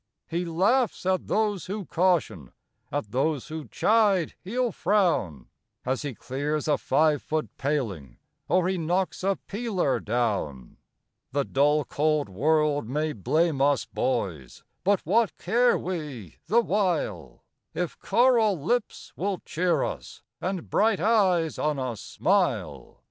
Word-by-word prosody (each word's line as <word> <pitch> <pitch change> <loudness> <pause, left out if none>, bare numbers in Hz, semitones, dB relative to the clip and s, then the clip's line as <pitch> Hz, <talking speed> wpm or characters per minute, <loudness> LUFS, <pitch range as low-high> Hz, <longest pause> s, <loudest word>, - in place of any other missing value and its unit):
He 175 +2 -2
laughs 200 +8 +1
at 185 0 0
those 210 -3 0
who 200 +1 -4
caution, 165 - 0 0.4
at 105 - -3
those 140 +2 -1
who 155 -1 -6
chide 205 -6 +2
he'll 240 +5 -1
frown, 170 - +1 0.4
As 130 +1 -1
he 145 -4 -5
clears 145 +6 -3
a 150 -2 +2
five 155 -2 +2
foot 155 0 -3
paling, 110 - -2 0.3
or 180 -1 +3
he 190 -1 -1
knocks 180 +4 -1
a 195 0 +2
peeler 195 - -1
down. 105 - -2 0.6
The 140 0 +1
dull, 145 +1 +2
cold 150 -3 0
world 145 +4 +1
may 150 +3 -1
blame 155 - +1
us, 140 -3 +3
boys! 90 - -3 0.2
but 200 0 +2
what 220 +6 +1
care 245 +2 +3
we 150 - -6
the 230 +7 +4
while, 170 - -1 0.3
If 175 -1 -3
coral 230 -6 +3
lips 230 - -2
will 195 0 -1
cheer 170 -3 +1
us, 65 -6 -6 0.2
and 185 -2 -3
bright 215 -1 +2
eyes 185 -5 +2
on 150 -1 0
us 125 -5 -4
smile? - - -1
160 Hz, 130 wpm, -26 LUFS, 135-195 Hz, 0.6 s, the